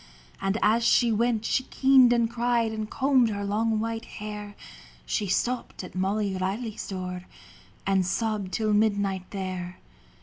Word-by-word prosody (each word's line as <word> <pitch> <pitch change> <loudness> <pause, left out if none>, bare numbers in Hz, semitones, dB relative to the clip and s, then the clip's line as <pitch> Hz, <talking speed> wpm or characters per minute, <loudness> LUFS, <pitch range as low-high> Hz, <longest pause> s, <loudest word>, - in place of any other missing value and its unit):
And 195 +2 0
as 225 +3 +3
she 235 0 +4
went 225 0 +1
she - - +1
keened 265 -3 +5
and 235 -1 +3
cried 235 -1 0
And 215 -1 -4
combed 260 -3 +3
her 200 -1 -3
long 220 +2 0
white 225 +1 -3
hair. 210 -1 -7 0.5
She 210 - -1
stopped 240 +4 -1
at 180 - -9
Molly 195 +1 -1
Reilly's 200 +4 -3
door, 180 -1 -5 0.6
And 195 -1 +2
sobbed 210 0 -2
till 215 +2 0
midnight 200 -3 +1
there. 185 -2 -5
215 Hz, 145 wpm, -26 LUFS, 195-230 Hz, 0.6 s, keened